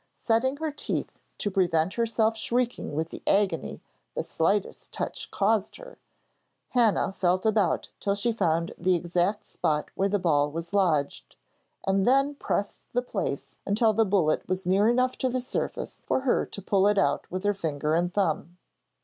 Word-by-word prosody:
Setting 255 Hz, +4 st, +1 dB
her 315 Hz, 0 st, -2 dB
teeth 295 Hz, -, -3 dB, 0.2 s
to 205 Hz, -, -1 dB
prevent 180 Hz, -2 st, +2 dB
herself 225 Hz, -1 st, +1 dB
shrieking 240 Hz, -6 st, -1 dB
with 160 Hz, +2 st, -1 dB
the -, -, -9 dB
agony 200 Hz, -1 st, +1 dB, 0.3 s
the -, -, -1 dB
slightest 195 Hz, +5 st, -1 dB
touch -, -, -4 dB
caused 210 Hz, 0 st, +1 dB
her, -, -, -12 dB, 0.7 s
Hannah 225 Hz, -5 st, +2 dB
felt 185 Hz, +1 st, +1 dB
about 215 Hz, -3 st, +2 dB
till 200 Hz, 0 st, 0 dB
she 205 Hz, +4 st, 0 dB
found 170 Hz, -6 st, 0 dB
the 180 Hz, +1 st, +3 dB
exact 175 Hz, +4 st, 0 dB
spot 150 Hz, -1 st, -1 dB
where 195 Hz, +1 st, 0 dB
the 205 Hz, -, +2 dB
ball 150 Hz, -6 st, +2 dB
was 165 Hz, +4 st, -6 dB
lodged, 165 Hz, -8 st, 0 dB, 0.5 s
and 195 Hz, +1 st, +2 dB
then 275 Hz, +3 st, +4 dB
pressed 205 Hz, -7 st, -3 dB
the 245 Hz, +1 st, +1 dB
place 195 Hz, -, -3 dB
until 215 Hz, +2 st, +2 dB
the 225 Hz, +2 st, +3 dB
bullet 185 Hz, -8 st, +1 dB
was 185 Hz, 0 st, -2 dB
near 195 Hz, +4 st, +4 dB
enough 255 Hz, +1 st, +1 dB
to 260 Hz, -, +1 dB
the 255 Hz, +1 st, -1 dB
surface 250 Hz, -, -4 dB
for -, -, +1 dB
her 265 Hz, -2 st, +1 dB
to 200 Hz, -, -8 dB
pull 195 Hz, 0 st, +3 dB
it 205 Hz, 0 st, +2 dB
out 195 Hz, -, +1 dB
with 185 Hz, +2 st, -4 dB
her 205 Hz, 0 st, +2 dB
finger 155 Hz, -5 st, -2 dB
and 175 Hz, +2 st, +1 dB
thumb. 175 Hz, -3 st, -1 dB
200 Hz, 170 wpm, -27 LUFS, 175-225 Hz, 0.7 s, then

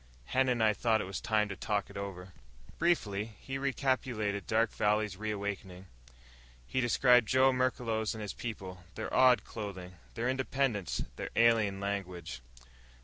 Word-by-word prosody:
Hen 130 Hz, -, +2 dB
and 120 Hz, -3 st, +2 dB
I 110 Hz, -1 st, +5 dB
thought 110 Hz, +1 st, +2 dB
it -, -, -2 dB
was 95 Hz, +1 st, -5 dB
time 110 Hz, -1 st, +2 dB
to 100 Hz, -, -4 dB
talk 105 Hz, +1 st, -2 dB
it -, -, -15 dB
over." 95 Hz, -2 st, -6 dB, 0.5 s
Briefly 110 Hz, -, 0 dB
he 135 Hz, 0 st, -5 dB
recapitulated 125 Hz, -7 st, -1 dB
Dark 115 Hz, 0 st, +2 dB
Valley's 105 Hz, -1 st, +1 dB
reawakening. 100 Hz, -3 st, -4 dB, 0.8 s
He 130 Hz, -, -1 dB
described 125 Hz, -1 st, +5 dB
Joe 130 Hz, 0 st, +4 dB
Merklos 115 Hz, -4 st, 0 dB
and 110 Hz, -, -6 dB
his 105 Hz, -, -4 dB
people 95 Hz, -6 st, -6 dB
their -, -, -5 dB
odd 125 Hz, -4 st, +6 dB
clothing, 95 Hz, -5 st, -7 dB, 0.2 s
their 115 Hz, +1 st, -1 dB
independence, 130 Hz, -, 0 dB
their -, -, -4 dB
alien 110 Hz, -4 st, +4 dB
language. 95 Hz, -7 st, -4 dB
110 Hz, 145 wpm, -32 LUFS, 100-125 Hz, 0.8 s, odd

